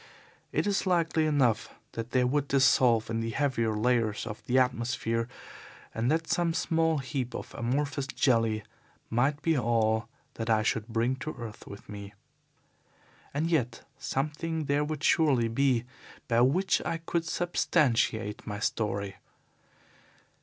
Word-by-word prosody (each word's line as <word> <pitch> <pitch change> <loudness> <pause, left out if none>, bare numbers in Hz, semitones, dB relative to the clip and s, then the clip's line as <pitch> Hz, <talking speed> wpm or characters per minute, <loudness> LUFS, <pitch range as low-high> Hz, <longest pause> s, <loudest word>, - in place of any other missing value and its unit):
It - - 0
is 200 -1 0
likely 165 -3 +2
enough 135 -7 +2 0.2
that 115 0 -5
they 125 0 +2
would 140 +3 +1
dissolve 125 -5 +4
in 115 - 0
the 115 0 -2
heavier 115 -4 0
layers 115 -2 +1
of 110 -1 -7
the 125 - +2
atmosphere, 120 -2 0 0.7
and 115 +2 0
that 160 +2 +1
some 170 -1 +1
small 160 -2 +1
heap 130 -2 -3
of - - -7
amorphous 140 +3 -1
jelly 115 -6 +1 0.5
might 135 +6 +1
be 165 -1 +3
all 115 -2 +1 0.3
that 115 - -3
I 110 -1 +3
should 110 0 0
bring 120 +3 0
to 155 +3 -5
earth 115 -2 -8
with 100 - -10
me. 100 -1 -9 1.2
And 160 +4 -1
yet 125 -8 0
something 150 +4 -2
there 145 +1 +1
would 150 -1 -4
surely 140 -8 +3
be 125 0 +2 0.4
by 115 -1 +3
which 170 +10 +3
I 165 - -1
could 165 0 -2
substantiate 130 - +1
my 105 -1 -4
story. 100 -3 -2
125 Hz, 140 wpm, -29 LUFS, 115-150 Hz, 1.2 s, dissolve